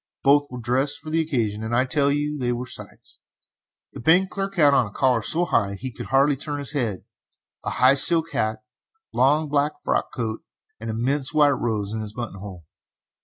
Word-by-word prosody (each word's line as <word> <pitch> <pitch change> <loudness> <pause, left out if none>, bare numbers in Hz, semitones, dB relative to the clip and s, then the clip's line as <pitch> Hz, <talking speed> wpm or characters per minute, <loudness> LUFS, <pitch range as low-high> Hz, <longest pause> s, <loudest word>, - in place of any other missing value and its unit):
Both 145 +1 +4
were 125 - -8
dressed 130 +5 -1
for 155 0 -9
the 165 +1 +2
occasion, 115 -9 -2
and 115 +1 -2
I 125 +2 +2
tell 140 +1 +1
you 145 +1 -2
they 120 -1 -1
were 120 +1 -3
sights! - - -9 0.7
The - - -9
bank 180 +9 +3
clerk 195 0 -4
had 145 -5 +5
on 125 -5 +3
a - - -12
collar 125 -1 +1
so 165 - 0
high 105 -11 +1
that 100 -1 -8
he 130 0 -5
could - - -9
hardly 140 +2 +3
turn 145 +2 -5
his 140 -1 -3
head, 115 - -2 0.6
a - - -2
high 130 +1 +5
silk 165 +4 +5
hat, 110 +3 -2 0.5
long 150 +4 +2
black 145 +1 0
frock - - -1
coat, 110 -2 -4 0.4
and 115 +1 -6
an 110 - -3
immense 135 +5 -2
white 150 -1 +5
rose 110 -6 -2
in 110 - -3
his 105 -1 -7
buttonhole. 100 -7 -8
130 Hz, 205 wpm, -23 LUFS, 115-145 Hz, 0.7 s, had